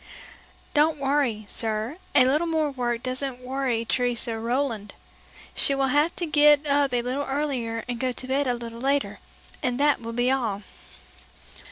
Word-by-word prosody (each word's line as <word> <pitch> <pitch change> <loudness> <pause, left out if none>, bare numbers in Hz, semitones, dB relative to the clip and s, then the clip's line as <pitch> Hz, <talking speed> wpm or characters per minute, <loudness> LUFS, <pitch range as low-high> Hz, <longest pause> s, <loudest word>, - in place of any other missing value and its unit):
"Don't 305 +1 +3
worry, 270 -6 0
sir, 220 +7 -2 0.2
a 255 - +7
little 300 +6 +2
more 315 -3 0
work 240 -3 -2
doesn't 255 0 -2
worry 255 -2 -2
Teresa 240 -2 -1
Rouland. 230 -3 -2 0.6
She 275 - +2
will 270 -1 +1
have 295 +5 +2
to 350 - -2
get 295 -1 +5
up 285 -1 +2
a 245 -1 0
little 265 +4 -2
earlier 260 -6 -2
and 245 -1 -4
go 255 0 0
to 255 +1 -4
bed 270 +1 +1
a 245 - +1
little 235 -1 -8
later, 275 +1 0 0.4
and 250 -2 -1
that 290 -2 +3
will 230 0 -6
be 245 +2 +2
all." 225 -7 -1
260 Hz, 165 wpm, -25 LUFS, 235-285 Hz, 0.6 s, a